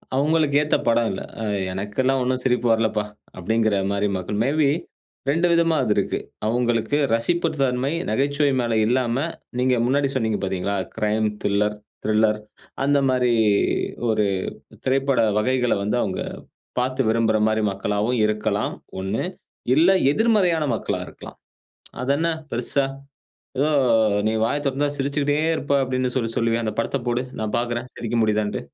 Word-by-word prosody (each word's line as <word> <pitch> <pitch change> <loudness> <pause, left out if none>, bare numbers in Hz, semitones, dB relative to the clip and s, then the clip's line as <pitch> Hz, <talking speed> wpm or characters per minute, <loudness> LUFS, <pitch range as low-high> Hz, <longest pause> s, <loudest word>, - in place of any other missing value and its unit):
அவுங்களுக்கு 150 +1 +2
ஏத்த 150 - +1
படம் 115 0 +3
இல்ல. 95 - -5 0.2
அ - - -2 0.3
எனக்குல்லாம் 105 +8 0
ஒண்ணும் 130 0 -1
சிரிப்பு 125 -2 +1
வரலப்பா! 110 -2 +1 0.3
அப்பிடிங்கிறமாரி 100 0 0
மக்கள். 100 +3 -4
மே 135 - +1
பி 145 - +4 0.6
2 165 +4 +2
விதமா 170 -1 +3
அது 105 -4 +2
இருக்கு. 100 - 0 0.3
அவுங்களுக்கு 120 +3 +1 0.2
ரசிப்புத்தன்மை 135 -1 0 0.2
நகைச்சுவை 140 +1 +1
மேல 115 -1 -1
இல்லாம 125 +2 +1 0.3
நீங்க 125 0 +3
முன்னாடி 140 +2 +2
சொன்னீங்க 110 -4 0
பாத்தீங்களா! 95 +1 -1 0.2
க்ரைம், 110 0 +1 0.2
தில்லர் 105 +1 +1 0.3
திரில்லர் 110 0 +2 0.5
அந்தமாரி 135 -3 +2 0.8
ஒரு 110 -1 +2 0.6
திரைப்பட 135 -1 +2 0.2
வகைகளை 125 +1 +1
வந்து 105 +4 0
அவுங்க 95 -3 -2 0.6
பாத்து 130 +1 0
விரும்புறமாரி 110 -1 +2
மக்களாகவும் 105 +5 -1
இருக்கலாம். 105 -1 -1 0.3
ஒண்ணு. 95 +3 -2 0.5
இல்ல 165 +5 +5 0.2
எதிர்மறையான 185 -5 +2
மக்களா - - -3
இருக்கலாம். - - -12 0.7
அதென்ன 140 +6 +1 0.2
பெருசா 125 +3 0 0.7
ஏதோ 145 +3 +2 0.6
நீ - - +1
வாயத் 145 +4 -1
தொறந்தா 140 +2 +1
சிரிச்சுக்கிட்டே 145 +1 0 0.2
இருப்ப 140 -2 -2
அப்பிடின்னு 130 -1 -1
சொல்லி, 115 -3 0
சொல்லுவியே 115 0 +1
அந்தப் 110 - -3
படத்தப் 130 +2 -2
போடு! 120 +1 +1 0.2
நான் 110 -1 -3
பாக்குறேன். 120 +1 -2
சிரிக்க 120 0 -3
முடியுதான்னு. 105 -1 0
120 Hz, 130 wpm, -23 LUFS, 110-140 Hz, 0.8 s, இல்ல